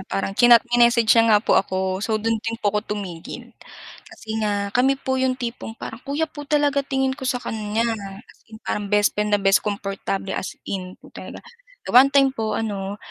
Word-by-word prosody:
parang 195 0 -2
chinat 240 +2 +6
mi-message 235 -2 +4
siya 230 -1 +4
nga 210 - +6
po - - +2
ako 190 0 -3
so 220 +1 0
do'n 225 +1 -1
din 225 +1 -4
po 205 -3 -1
ako 210 0 -2
tumigil, 175 -5 -8 0.6
kasi 220 - -16
nga 205 -1 -1
kami 265 +3 +3
po 260 -1 -2
'yong 260 -1 +1
tipong 235 -2 -6
parang 225 - -8
kuya 290 +3 -1
po 290 -1 -9
talaga 290 -2 +2
tingin 265 -1 0
ko 265 - -8
sa 250 - 0
kanya 215 +1 -2 0.4
as - - -22
in 220 - -11
parang 205 -1 -3
best 205 0 +3
friend 210 0 -1
na - - -7
best 195 0 +4
kumportable 195 -1 -3
as - - -5
in 185 -2 -5
po - - -17
talaga. - - -10 0.5
One 255 +3 +8
time 275 -1 +5
po 220 -4 -2
ano 200 -2 -3
220 Hz, 195 wpm, -22 LUFS, 200-250 Hz, 0.6 s, One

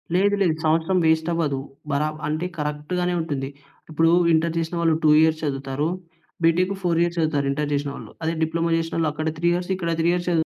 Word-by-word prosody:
లేదు, 200 +2 +3
లేదు. 170 -4 +3
సంవత్సరం 165 +4 +2
వేస్ట్‌ 160 +1 +2
అవదు. 150 -5 0 0.3
బరాబ్ 155 +2 -1
అంటే 155 +3 -2
కరెక్ట్‌గానే 150 +4 -2
ఉంటుంది. 140 -4 -3 0.4
ఇప్పుడు 165 +1 +3 0.2
ఇంటర్ 165 +1 +1
చేసినవాళ్ళు 165 -1 0
2 155 - +5
ఇయర్స్ 160 0 +3
చదువుతారు. 135 +1 -2 0.6
బి‌టెక్ 180 +4 +3
4 170 -2 +1
ఇయర్స్ 170 0 -2
చదువుతారు 150 -3 +1
ఇంటర్ 150 +1 -2
చేసినవాళ్ళు. 140 0 -4
అదే 160 - 0
డిప్లొమా 165 +1 0
చేసినోళ్ళు 165 -1 -1
అక్కడ 155 +1 -4
3 170 - 0
ఇయర్స్ 175 +1 -3
ఇక్కడ 170 -2 -2
3 170 - +2
ఇయర్స్ 180 0 -2
చదు 170 - +2
160 Hz, 180 wpm, -23 LUFS, 150-170 Hz, 0.6 s, 2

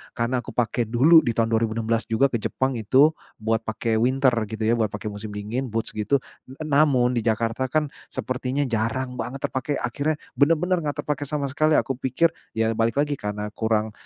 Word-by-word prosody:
karena 120 +2 0
aku 120 - -8
pake 120 -1 0
dulu 140 +9 +6
di 120 -6 -2
tahun 115 -1 +1
2016 115 0 0
juga 130 +4 +2
ke 120 - 0
Jepang, 130 +3 -1
itu 135 +8 +5 0.3
buat 110 +1 0
pake 110 0 0
winter 130 +2 +3 0.2
gitu 110 0 -5
ya, 115 +2 +2
buat 110 - +2
pake 105 +1 -5
musim 105 +1 -7
dingin, 115 +6 -3
boots 115 -1 -2
gitu. 105 +6 +1 0.3
N 150 +4 -7
namun 135 -4 +4
di 120 - 0
Jakarta 115 +3 0
kan, 150 +2 0 0.2
sepertinya 130 +2 -2
jarang 125 +1 -2
banget 135 +2 -5
terpakai. 135 +2 -2
Akhirnya, 140 +6 -1 0.2
bener-bener 165 +5 +3
enggak 145 -2 -3
terpakai 145 -1 -2
sama 150 0 -1
sekali. 155 +2 +2
Aku 135 -3 0
pikir, 150 +6 +2 0.2
ya 110 0 +1
balik 115 +1 0
lagi 145 -1 0
karena 105 0 -4
kurang 110 -1 0
125 Hz, 190 wpm, -24 LUFS, 110-140 Hz, 0.3 s, dulu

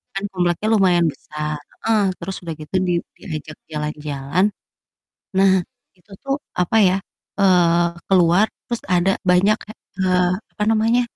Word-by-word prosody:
Kan 195 - -3
kompleknya 175 +2 0
lumayan 180 -5 +4
besar, 150 +1 -5 0.2
heeh, 225 -1 +3 0.2
terus 190 +2 -5
udah 165 -2 -4
gitu 155 +5 -7
di - - +1 0.3
diajak 155 -3 -7
jalan-jalan, 150 +2 -1 0.9
nah 195 0 +5 0.5
itu 180 +4 -30
tuh, 275 0 0 0.3
apa 180 +5 +1
ya, 185 - +2 0.4
eee, 175 -3 +4 0.2
keluar 180 +2 +5 0.2
terus 235 -1 -4
ada 180 +2 +3 0.2
banyak 195 +4 +4
kek, 215 - -13 0.2
eee, 180 -1 +3 0.3
apa - - -5
namanya, 225 +2 +3
180 Hz, 135 wpm, -21 LUFS, 165-195 Hz, 0.9 s, nah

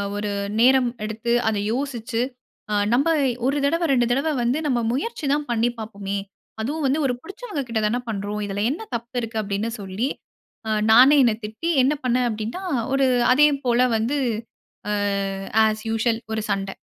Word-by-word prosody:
ஒரு 205 0 -2 0.3
நேரம் 255 +1 +5 0.2
எடுத்து 220 +2 -3 0.2
அத 220 -1 +1
யோசிச்சு, 240 -3 -2 0.5
ஆ - - 0 0.2
நம்ப 275 +7 +3 0.4
1 275 +2 +1
தடவ 335 +4 +1
2 245 -3 +3
தடவ 275 +6 +1
வந்து 245 +4 +1
நம்ம 255 -5 +1
முயற்சி 310 - -3
தான் 295 0 -1
பண்ணி 235 +1 +2
பாப்போமே! 200 -3 -5 0.4
அதுவும் 295 +7 -2
வந்து 275 +3 +2
ஒரு 255 - +1
பிடிச்சவங்கக்கிட்டதான 255 - -2
பண்றோம். 205 0 -3
இதில 200 0 -2
என்ன 310 - -4
தப்பு 235 +2 -7
இருக்கு? 225 -1 -5
அப்பிடின்னு 205 +2 -2
சொல்லி, 200 +5 -2 0.6
ஆ - - -2 0.2
நானே 255 +6 +8
என்ன 235 -3 +4
திட்டி, 220 +11 -4
என்ன 270 +3 +3
பண்ணேன் 250 0 +2
அப்பிடின்னா, 225 - -4 0.3
ஒரு 270 0 +3 0.3
அதே 295 +3 +6 0.2
போல 240 0 +3 0.2
வந்து 235 +7 0 0.7
ஆ - - 0 0.7
ஆஸ் 215 0 0
யூசுவல் 225 0 +1
ஒரு 220 - -1
சண்ட. 195 -1 -1
235 Hz, 155 wpm, -23 LUFS, 215-270 Hz, 0.7 s, நானே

